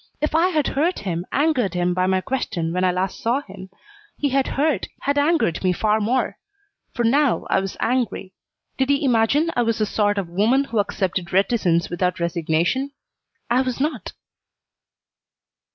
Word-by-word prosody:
If 300 +1 -1
I 330 +3 +4
had 310 -6 0
hurt 325 +7 0
him, 175 -2 -4
angered 265 - +1
him 180 0 +1
by 185 +1 +1
my 190 0 +1
question 185 -10 -2
when 180 +1 0
I 185 - +3
last 185 +1 -2
saw 240 +5 +1
him, 190 -3 -11 0.5
he 290 - 0
had 270 0 +1
hurt, 300 +2 +1
had 285 +1 +1
angered 290 - +1
me 185 -1 +2
far 215 +3 +1
more. 235 +5 -1 0.5
For 240 - -2
now 275 +3 +2
I - - +4
was 195 0 -5
angry. 240 -6 -1 0.5
Did 265 +1 +1
he 280 +1 +2
imagine 265 +7 +2
I 245 - +2
was 230 -2 0
the 215 - +1
sort 205 0 0
of 195 -3 -2
woman 215 +10 +2
who 230 -5 -2
accepted 185 -3 -2
reticence 190 -4 +1
with 175 - -5 0.2
resignation? 170 - 0 0.5
I 245 +2 +2
was 255 -1 -3
not. 300 +3 -2
225 Hz, 170 wpm, -22 LUFS, 185-275 Hz, 0.5 s, I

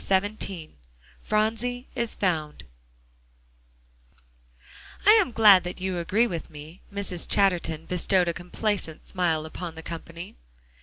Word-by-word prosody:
XVII 195 -4 -1 0.5
PHRONSIE 225 +4 -1
IS 235 -3 0
FOUND 160 -6 -1 2.4
"I 415 - +9
am 425 - +5
glad 210 -5 +7
that 180 +1 -6
you 185 -1 -2
agree 200 +7 +2
with 170 -9 -4
me." 155 +3 -11
Mrs. 195 -4 -3
Chatterton 170 -5 +1
bestowed 180 0 +1
a 170 - 0
complacent 180 -1 -3
smile 165 -4 0
upon 165 +1 -7
the 160 - -9
company. 165 - -8
180 Hz, 115 wpm, -26 LUFS, 165-210 Hz, 2.4 s, I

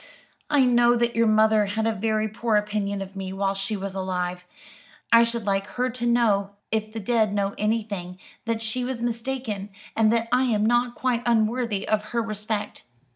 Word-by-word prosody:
I 290 -3 +4
know 240 -1 +4
that 235 0 0
your 230 0 +3
mother 215 -1 +4
had 220 +2 -1
a 225 - +2
very 215 +1 0
poor 220 +1 -1
opinion 205 -1 -1
of 195 +1 -12
me 190 -1 -5
while 195 0 0
she 195 +2 -3
was 195 0 -5
alive; 180 -1 -3 0.7
I 230 0 +8
should 235 -2 -2
like 195 0 0
her 250 +1 +1
to 240 0 -4
know, 205 -4 +2 0.2
if 215 0 -1
the 225 - -5
dead 215 -1 +1
know 200 -1 0
anything, 205 -4 -2 0.3
that 230 -1 -2
she 225 +3 -2
was 250 -1 -3
mistaken, 235 -3 -3 0.3
and 220 -1 +4
that 230 0 +1
I 255 +1 +3
am 215 -4 +1
not 240 +1 +2
quite 250 -2 0
unworthy 230 -2 +1
of 215 -1 +1
her - - +3
respect. 210 -1 -4
220 Hz, 185 wpm, -25 LUFS, 200-235 Hz, 0.7 s, I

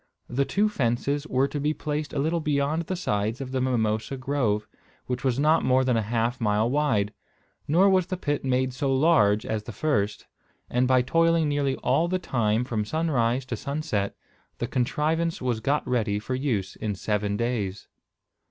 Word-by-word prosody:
The 135 +3 0
two 205 +7 +2
fences 140 - -1
were 130 0 +2
to 145 - -4
be 150 +2 0
placed 150 0 -3
a - - -5
little 160 +4 +1
beyond 150 +2 0
the 185 - -1
sides 110 - -1
of 135 -2 -5
the 130 -1 -1
mimosa 110 -1 0
grove, 125 -6 0 0.4
which 125 -1 -3
was 130 -2 +1
not 155 +3 +3
more 130 +1 +3
than 125 -2 +2
half 115 +3 -1
a - - -1
mile 105 +1 +2
wide; 120 -8 +1 0.5
nor 175 +7 +5
was 185 -2 +3
the 185 - -3
pit 145 -4 -2
made 130 -1 +1
so 135 +1 -1
large 130 -8 +3
as 110 -1 -3
the - - -6
first; 105 -7 -1 0.5
and 125 +1 +2
by 130 -1 +4
toiling 165 +3 +3
nearly 145 -2 0
all 135 +7 +2
the 185 +1 0
time 115 -9 0
from 115 -4 -2
sunrise 130 -2 0
to 125 - -3
sunset, 140 -6 -2 0.4
the - - -2
contrivance 155 +6 0
was 125 -3 -1
got 140 +6 0
ready 110 -5 0
for 110 +5 -4
use 120 -8 -1
in 105 -2 -3
seven 105 +1 -1
days. 110 -5 -2
130 Hz, 180 wpm, -26 LUFS, 110-150 Hz, 0.5 s, nor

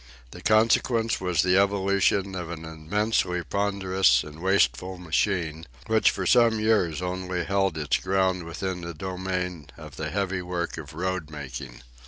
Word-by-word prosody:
The - - -10
consequence 115 +1 +2
was 90 -3 +1
the 90 +1 +4
evolution 100 0 +2
of 90 -3 -5
an 80 -1 -6
immensely 90 +3 -1
ponderous 95 -7 +2
and 75 +1 -11
wasteful 95 -1 +1
machine, 85 -2 -1 0.2
which 110 0 +4
for 95 - -3
some 115 0 +4
years 95 -7 +1
only 90 0 -2
held 95 -4 +1
its 75 -2 +1
ground 95 -1 0
within 90 +2 -4
the 85 -1 -6
domain 90 -2 -4
of - - -11
the - - -3
heavy 95 -2 -1
work 90 -2 -3
of 75 -1 -10
roadmaking. 75 -8 -5
90 Hz, 145 wpm, -26 LUFS, 80-100 Hz, 0.2 s, the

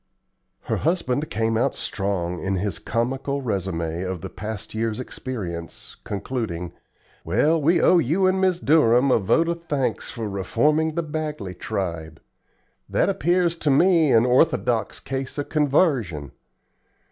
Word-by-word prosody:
Her - - -2
husband 155 -3 0
came 115 -4 0
out 125 +4 +1
strong 90 -3 -2
in 95 0 -1
his 95 -1 -2
comical 135 +4 -2
resume 90 -6 -2
of 95 -2 -4
the - - -7
past 105 -2 -6
year's 110 0 -2
experience, 95 -10 -6
concluding: 100 -5 -4 0.5
"Well, 150 - +2
we 165 +5 +3
owe 180 - +5
you 170 +6 +1
and 190 0 +2
Mrs. 185 -2 +1
Durham 135 -3 +4
a - - +4
vote 115 - +2
of 170 0 -3
thanks 140 -5 -1
for 115 -2 -5
reforming 150 - +1
the 170 - 0
Bagley 150 -10 -4
tribe. 85 -5 -4 0.7
That - - +2
appears 175 +1 +1
to 155 - -1
me 165 +1 +4
an 115 0 +5
orthodox 125 -5 +2
case 135 +1 -5
of 145 - -3
convarsion. 135 - +1
125 Hz, 140 wpm, -23 LUFS, 95-155 Hz, 0.7 s, owe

